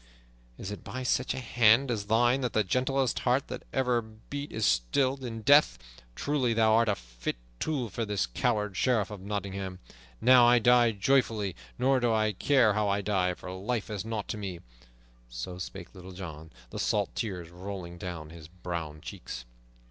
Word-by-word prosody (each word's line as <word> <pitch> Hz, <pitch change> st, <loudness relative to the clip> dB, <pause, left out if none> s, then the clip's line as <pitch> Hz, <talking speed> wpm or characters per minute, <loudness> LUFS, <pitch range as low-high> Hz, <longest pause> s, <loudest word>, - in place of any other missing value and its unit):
Is 95 Hz, -, -6 dB
it 105 Hz, -, -7 dB
by 130 Hz, 0 st, -5 dB
such 125 Hz, +1 st, 0 dB
a -, -, -3 dB
hand 120 Hz, +1 st, +4 dB
as 105 Hz, -3 st, -2 dB
thine 120 Hz, +4 st, +3 dB
that 125 Hz, -3 st, -2 dB
the 110 Hz, -, +3 dB
gentlest 130 Hz, +4 st, 0 dB
heart 130 Hz, +3 st, +1 dB
that -, -, -5 dB
ever 125 Hz, -2 st, +1 dB
beat 110 Hz, +6 st, -8 dB
is 110 Hz, -1 st, -1 dB
stilled 130 Hz, -, +1 dB
in 115 Hz, -3 st, -5 dB
death? 145 Hz, +4 st, +6 dB, 0.4 s
Truly, 130 Hz, -5 st, 0 dB
thou 110 Hz, -1 st, +4 dB
art 115 Hz, 0 st, +4 dB
a 100 Hz, -, +2 dB
fit -, -, -5 dB, 0.2 s
tool 140 Hz, -6 st, -1 dB
for 115 Hz, +3 st, -3 dB
this 105 Hz, -3 st, 0 dB
coward 105 Hz, -, -1 dB
Sheriff 115 Hz, -4 st, +1 dB
of 105 Hz, -3 st, -7 dB
Nottingham. 100 Hz, -2 st, -4 dB, 0.4 s
Now 125 Hz, -, +7 dB
I 120 Hz, 0 st, +6 dB
die 120 Hz, 0 st, +5 dB
joyfully, 110 Hz, -3 st, +1 dB, 0.2 s
nor 130 Hz, +1 st, +3 dB
do 120 Hz, -1 st, +2 dB
I 110 Hz, -1 st, +2 dB
care 115 Hz, +1 st, +3 dB
how 105 Hz, 0 st, +1 dB
I 100 Hz, +1 st, +1 dB
die, 95 Hz, -3 st, 0 dB
for 90 Hz, -, -8 dB
life 105 Hz, +4 st, -3 dB
is 100 Hz, -3 st, -3 dB
nought 110 Hz, -2 st, -4 dB
to -, -, -3 dB
me!" 95 Hz, -4 st, -5 dB, 0.7 s
So -, -, -6 dB
spake 90 Hz, -, -7 dB
Little 95 Hz, 0 st, -11 dB
John, 80 Hz, -4 st, -8 dB, 0.2 s
the -, -, -5 dB
salt -, -, 0 dB
tears 90 Hz, -6 st, -4 dB
rolling 90 Hz, -1 st, -7 dB
down 85 Hz, -4 st, -6 dB
his 80 Hz, -2 st, -11 dB
brown 85 Hz, -3 st, -6 dB
cheeks. -, -, -8 dB
105 Hz, 180 wpm, -29 LUFS, 90-125 Hz, 0.7 s, Now